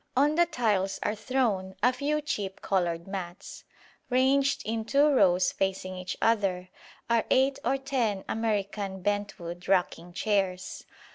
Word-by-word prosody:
On 290 +3 +4
the 345 +2 +3
tiles 205 - 0
are 210 - 0
thrown 215 -5 -1
a 250 +2 +5
few 295 +3 -1
cheap 200 -10 -4
coloured 170 -3 0
mats. 185 -2 -7 0.4
Ranged 270 +2 +2
in 225 0 -2
two 280 +6 +3
rows 185 -11 +4
facing 190 -1 -2
each 185 0 -5
other 195 -5 +1 0.4
are 230 -1 +2
eight 270 +1 +3
or 265 +3 +1
ten 245 -8 -1
American 200 -3 -2
bentwood 190 -4 -3
rocking 180 -2 +1
chairs. 185 -2 -1
205 Hz, 135 wpm, -28 LUFS, 185-255 Hz, 0.4 s, a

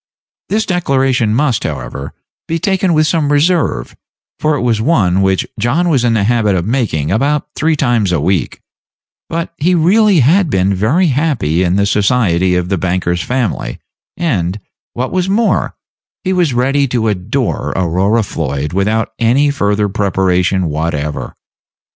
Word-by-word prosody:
This 215 +2 0
declaration 135 - +1
must, 130 -3 +1
however, 70 +1 -5 0.3
be 165 - -1
taken 190 -1 0
with 155 0 +3
some 155 -2 0
reserve, 145 - +1 0.4
for 155 0 +1
it 145 - -2
was 115 -3 +1
one 100 - +2
which 95 -1 +1
John 145 +11 +1
was 135 -7 +2
in 115 -2 +2
the 105 - +1
habit 110 -2 +1
of 85 -2 -1
making 105 - -1
about 140 +8 0
three 160 +1 +1
times 120 -9 +1
a 90 - +1
week; 90 +3 -1 0.7
but 165 0 -3
he 175 +5 +2
really 190 +2 +4
had 170 +7 +3
been 95 -3 +1
very 135 - +2
happy 125 - 0
in 90 0 +1
the 100 0 +2
society 100 -4 +1
of 90 0 -1
the 95 -3 0
banker's 90 -1 -1
family, 115 - -2 0.4
and, 105 - -1 0.4
what 125 +2 -2
was 185 0 -1
more, 220 +3 +1 0.5
he 190 -1 0
was 175 -5 +1
ready 135 +3 +1
to 120 -3 -1
adore 110 +5 -2
Aurora 95 +6 +1
Floyd 75 -6 -3
without 110 +4 0
any 130 +5 +3
further 105 -5 0
preparation 95 -2 0
whatever. 75 -1 -3
115 Hz, 155 wpm, -14 LUFS, 95-150 Hz, 0.7 s, really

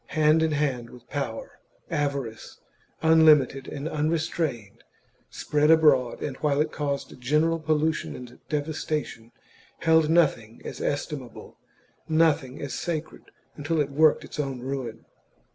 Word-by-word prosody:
Hand 155 +1 +4
in 160 -1 +1
hand 135 -5 -1
with 125 0 -15
power, 135 -6 -5 0.3
avarice, 140 -6 -3 0.5
unlimited 155 -5 +5
and 145 +1 -5
un 155 -1 -1
restrained, 155 - -3 0.5
spread 150 0 0
abroad, 150 -6 +4
and, 140 -3 -3
while 145 -2 0
it 155 +1 +1
caused 140 -3 -4
general 155 +5 +2
pollution 155 0 0
and 125 0 -11
devastation, 150 -5 -3 0.5
held 160 -1 +4
nothing 135 -9 +2
as - - -7
estimable, 145 -3 -5 0.5
nothing 155 -4 +2
as 140 - -5
sacred 160 -2 -4 0.3
until 155 +2 -1
it 145 -1 0
worked 155 +2 +4
its - - -9
own 135 -4 -3
ruin. 130 -3 -5
150 Hz, 125 wpm, -26 LUFS, 130-155 Hz, 0.5 s, unlimited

